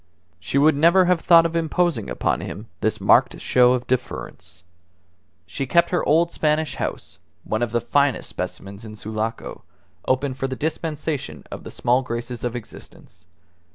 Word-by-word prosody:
She 100 +9 -2
would 150 +2 +5
never 170 +5 +5
have 180 -2 +2
thought 165 -2 +6
of 165 0 -2
imposing 165 - 0
upon - - -1
him - - -7
this - - -1
marked - - +4
show 125 0 +4
of 125 -1 -2
deference. 125 -7 -4 0.8
She 110 +10 -4
kept 170 +5 +3
her 175 - +1
old 165 +3 +3
Spanish 155 0 0
house 95 - -5 0.2
(one 110 - -2
of 120 -2 -1
the 120 0 0
finest 140 -3 +1
specimens 100 +2 -6
in 110 -1 -9
Sulaco) 110 +1 -5 0.5
open 130 +1 +1
for 135 +1 -3
the 130 - -4
dispensation 150 - -4
of - - -7
the - - -8
small 125 +2 +1
graces 120 -1 -5
of 120 -1 -2
existence. 95 -6 -11
130 Hz, 160 wpm, -22 LUFS, 115-160 Hz, 0.8 s, thought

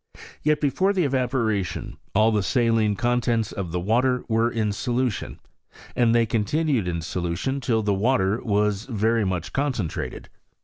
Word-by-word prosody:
Yet 150 0 +2
before 185 +7 +1
the 185 -3 +1
evaporation, 125 -8 -1 0.2
all 110 +2 +4
the 105 -2 +1
saUne 110 0 +1
contents 120 -2 0
of 95 -4 -5
the 90 - -1
water 125 +7 +1
were 115 +1 +2
in 110 -3 -1
solution, 120 +1 -2 0.6
and 120 -1 +3
they 115 -1 +4
continued 115 - 0
in 85 -2 -2
solution 90 - -2
till 115 -3 +1
the 105 -1 +1
water 100 0 +1
was 105 0 0
very 115 -2 +1
much 90 -3 -3
concentrated. 130 - -2
115 Hz, 145 wpm, -24 LUFS, 100-125 Hz, 0.6 s, all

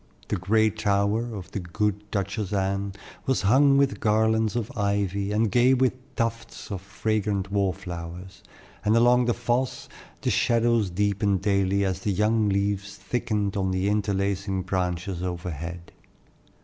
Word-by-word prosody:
The - - +1
gray 110 +4 +2
tower 105 +2 0
of 95 -2 -8
the - - -3
good 105 +3 -2
Duchess 100 0 -2
Anne 100 0 -1 0.3
was 130 -5 +1
hung 135 +7 +5
with 140 -1 +2
garlands 110 +1 +2
of 120 +3 -3
ivy 100 -1 0
and 110 0 +1
gay 125 +2 +5
with 130 0 +2 0.2
tufts 115 -1 -3
of 95 -2 -4
fragrant 100 0 -1
wallflowers, 90 -2 -3 0.4
and 110 +2 +3
along 120 +1 +5
the 120 - +1
fosse 120 +2 -1 0.3
the - - 0
shadows 115 -3 +2
deepened 100 0 0
daily 100 -1 +2
as 95 -1 -1
the 105 - -1
young 105 +2 +2
leaves 100 0 -1
thickened 105 -5 -2
on 95 -2 0
the 95 +1 0
interlacing 100 -2 0
branches 90 -1 -2
overhead. 85 -1 -5
100 Hz, 140 wpm, -26 LUFS, 95-110 Hz, 0.4 s, hung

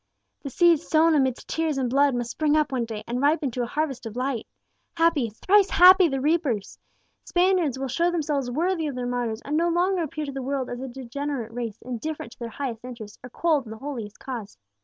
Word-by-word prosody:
"The 280 - -5
seed 340 +3 +4
sown 325 +1 +3
amidst 265 -4 +1
tears 320 -3 -1
and 260 -2 0
blood 275 +1 +3
must 240 -1 -2
spring 305 -1 +1
up 305 -2 +1
one 250 -3 0
day, 220 -2 -6
and 245 +2 -3
ripen 290 -1 +2
to 245 - -3
a 240 - -1
harvest 270 -3 -2
of 220 - -9
light! 255 -2 -2 0.5
Happy 330 -8 +3
thrice 390 - +3
happy 370 0 +8
the 270 -3 -2
reapers! 285 - 0 0.4
Spaniards 355 -7 +2
will 270 0 -3
show 335 +7 +1
themselves 295 -6 -1
worthy 325 +4 0
of 280 - -4
their 250 -1 -3
martyrs, 245 -2 -2
and 290 - -2
no 340 +2 +2
longer 355 +2 +1
appear 310 -1 -3
to 280 - -5
the 270 0 -5
world 265 0 -2
as 245 - -5
a 265 - -4
degenerate 260 -1 -5
race, 230 -3 -4
indifferent 250 +1 -5
to - - -16
their 235 -1 -5
highest 240 -3 -5
interests, 230 -4 -9
or 250 - -8
cold 305 0 +1
in - - -9
the 220 - -7
holiest 230 -6 -6
cause. 235 - -7
270 Hz, 220 wpm, -25 LUFS, 245-315 Hz, 0.5 s, happy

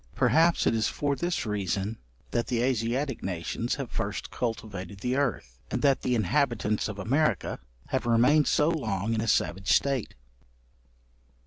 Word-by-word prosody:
Perhaps 165 +2 +3
it - - +3
is 110 -1 +1
for 145 -1 -1
this 175 0 -2
reason, 105 +1 -2 0.3
that 120 - 0
the 120 -1 0
Asiatic 130 +2 0
nations 90 +6 -2
have 135 -4 -6
first 105 -2 -3
cultivated 100 -5 -4
the 125 +2 0
earth, 110 - -2
and - - -2
that 140 -2 +4
the 125 - +1
inhabitants 120 -3 +1
of 105 -2 -6
America 135 +10 0 0.3
have - - -1
remained 125 +6 +4
so 150 - +3
long 110 - -1
in 110 - 0
a 115 - -2
savage 95 -1 +1
state. 135 -5 +1
115 Hz, 150 wpm, -28 LUFS, 105-140 Hz, 0.3 s, that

